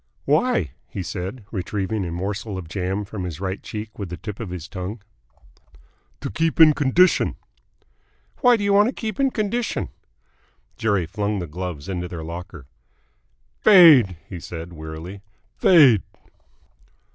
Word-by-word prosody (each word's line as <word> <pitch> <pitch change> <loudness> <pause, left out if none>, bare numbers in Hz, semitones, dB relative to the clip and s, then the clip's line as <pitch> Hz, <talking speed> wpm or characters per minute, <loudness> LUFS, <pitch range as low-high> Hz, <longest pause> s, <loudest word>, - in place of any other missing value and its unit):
"Why?" 150 - +2 0.2
he 95 - -5
said, 95 +6 -6
retrieving 100 +1 -2
a - - -5
morsel 100 +3 -4
of 90 -3 -7
jam 95 +3 -3
from 100 -2 -6
his 85 -4 -5
right 95 0 -3
cheek 110 0 -7
with 100 -4 -5
the 85 - -6
tip 105 -1 -7
of 115 -5 -5
his 90 -2 -6
tongue. 100 +4 -6 1.2
"To - - -4
keep 165 +11 -1
in 155 -2 +8
condition." 150 +6 +3 1.0
"Why 245 -2 +5
do 205 - -3
you 200 0 +2
want 205 +3 +5
to - - -4
keep 220 -4 -5
in 275 -1 +3
condition?" 230 0 -2 0.9
Jerry 100 -5 0
flung 105 +4 -2
the 90 - -3
gloves 85 -2 -6
into 90 -2 -3
their 85 -2 -7
locker. 85 -2 -8 0.9
"Fade!" 155 - +7
he 90 - -7
said 85 +1 -8
wearily. 80 +5 -8 0.4
"Fade!" 135 - +6
100 Hz, 145 wpm, -22 LUFS, 90-145 Hz, 1.2 s, in